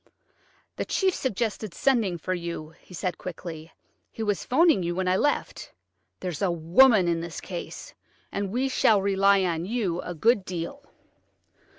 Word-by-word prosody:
"The - - -2
chief 380 -1 +1
suggested 215 - -2
sending 225 -10 +2
for 185 +3 -3
you," 170 -3 -5
he - - -22
said 180 0 -3
quickly; 165 -2 -7 0.4
"he 225 - -6
was 205 -2 -1
'phoning 310 - +4
you 175 0 -2
when 185 0 -1
I 185 - +3
left. 290 +9 -1 0.5
There's 180 -4 -4
a 195 - +2
woman 180 +5 +5
in 170 -1 0
this 170 -1 -6
case, 175 -3 -7 0.4
and 200 -1 -2
we 250 +6 0
shall 220 -5 +3
rely 195 0 +4
on 170 -2 -1
you 195 -4 -1
a 175 - -6
good 215 +5 +3
deal." 185 +11 -5
185 Hz, 160 wpm, -26 LUFS, 170-225 Hz, 0.5 s, woman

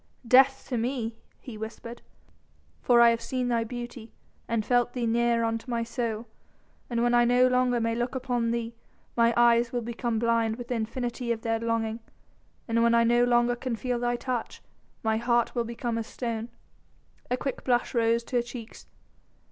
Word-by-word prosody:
"Death 265 +2 +5
to 245 -4 -1
me," 235 -1 -2 0.2
he 225 -4 -9
whispered, 230 +2 -8 0.8
"for 240 -1 +5
I 235 0 +7
have 230 0 -1
seen 250 0 -2
thy 230 -1 +1
beauty 240 -1 -7 0.4
and 230 -2 -1
felt 245 0 +2
thee 245 -2 -2
near 235 0 +2
unto 225 +2 -2
my 235 -1 0
soul. 230 -1 -3 0.6
And 235 -1 0
when 240 0 +2
I 240 0 +5
no 245 +1 +4
longer 250 -1 +2
may 230 0 0
look 240 +3 -2
upon 245 -3 -1
thee 235 0 -2 0.4
mine 235 0 +3
eyes 235 0 +4
will 245 -2 -2
become 235 0 -2
blind 230 -1 +1
with 240 0 -9
the - - 0
infinity 235 +1 -3
of 225 -1 -2
their 225 -1 0
longing, 230 -1 -1 0.7
and 230 0 +1
when 235 0 +4
I 235 - +5
no 240 +1 +4
longer 240 0 +3
can 245 -1 -3
feel 245 +1 -2
thy 240 0 0
touch, 245 -1 -4 0.4
my 220 0 +1
heart 235 0 +1
will 235 -2 -1
become 235 0 -3
as 225 - -5
a - - -14
stone." 230 -2 -4 0.8
A 250 - 0
quick 270 0 -4
blush 245 -2 +1
rose 230 -1 +2
to 245 - -2
her - - +3
cheeks. 240 -1 -10
235 Hz, 190 wpm, -27 LUFS, 230-245 Hz, 0.8 s, I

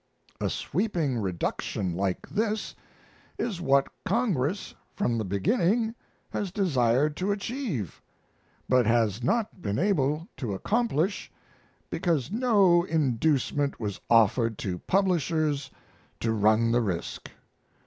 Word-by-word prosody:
A - - 0
sweeping 165 - -1
reduction 90 -1 -2
like 95 +1 -2
this 215 0 -1 0.6
is 200 -7 -3
what 140 -4 +3 0.2
Congress 195 - 0 0.2
from 120 - 0
the - - -1
beginning 195 - +1 0.4
has 205 - -2
desired 145 - +2
to 190 +2 0
achieve, 200 - -3 0.7
but 125 -3 +3
has 115 -2 +2
not 215 - 0
been 100 -7 -2
able 160 -4 +1
to 110 -8 -3
accomplish 200 - 0 0.6
because 160 -6 0
no 205 -7 +4
inducement 145 -2 0
was 105 -4 -4
offered 115 0 +4
to 90 -2 -3
publishers 155 - +1 0.5
to 115 - 0
run 110 +2 +3
the 120 +1 +3
risk. 95 -7 -4
145 Hz, 110 wpm, -27 LUFS, -, 0.7 s, no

